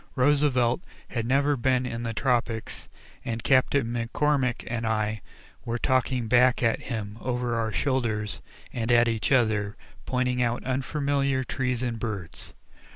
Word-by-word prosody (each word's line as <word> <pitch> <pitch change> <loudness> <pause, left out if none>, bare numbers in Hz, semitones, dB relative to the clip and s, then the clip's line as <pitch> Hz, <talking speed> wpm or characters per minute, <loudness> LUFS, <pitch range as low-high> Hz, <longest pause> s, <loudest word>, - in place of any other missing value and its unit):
Roosevelt 130 -1 +3 0.3
had 115 -2 -2
never 140 +3 +3
been 130 0 +1
in 115 -2 -4
the 115 -1 -2
tropics 115 -1 -1 0.3
and 115 -1 -4
Captain 130 +1 +3
McCormick 125 +3 0
and 115 -1 -3
I 110 -1 -1 0.4
were 120 0 -2
talking 130 -1 +1
back 125 +2 +4
at 115 -1 +2
him 110 -3 -5
over 125 -1 -1
our 115 -1 0
shoulders 110 -6 -1 0.3
and 115 0 -1
at 120 0 +5
each 115 +1 -1
other, 110 -5 +2 0.3
pointing 125 -1 0
out 120 0 0
unfamiliar 140 0 0
trees 125 -1 -2
and 120 -2 -2
birds. 100 -8 -5
120 Hz, 140 wpm, -26 LUFS, 115-130 Hz, 0.4 s, at